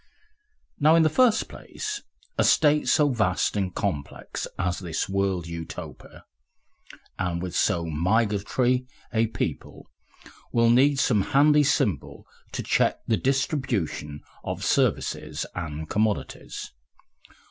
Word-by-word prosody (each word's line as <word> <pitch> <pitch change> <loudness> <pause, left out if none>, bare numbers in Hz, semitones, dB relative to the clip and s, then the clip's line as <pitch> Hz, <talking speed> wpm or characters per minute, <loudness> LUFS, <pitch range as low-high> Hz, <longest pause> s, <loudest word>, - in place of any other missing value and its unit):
Now 155 +2 +5
in 165 - +5
the 155 - +3
first 250 -4 +4
place, 425 -1 -6 0.3
a - - +2
state 150 -1 +4
so 150 -1 +4
vast 105 -8 +1
and 95 -3 -1
complex 85 -7 -4
as 90 0 -1
this 85 -4 -3
world 95 -3 0
Utopia, 85 -1 -8 0.9
and 90 -2 -1
with 90 0 -5
so 85 -1 +1
migratory 110 - +1 0.3
a 115 0 +2
people, 110 - -5 0.7
will 115 0 +4
need 135 +4 +4
some 110 -6 +3
handy 150 +7 +4
symbol 105 - 0 0.3
to - - -4
check - - +1
the 115 - +2
distribution 130 - -1 0.2
of - - -4
services 75 0 0
and 80 -2 -5
commodities. 105 +2 -2
105 Hz, 115 wpm, -25 LUFS, 85-135 Hz, 0.9 s, Now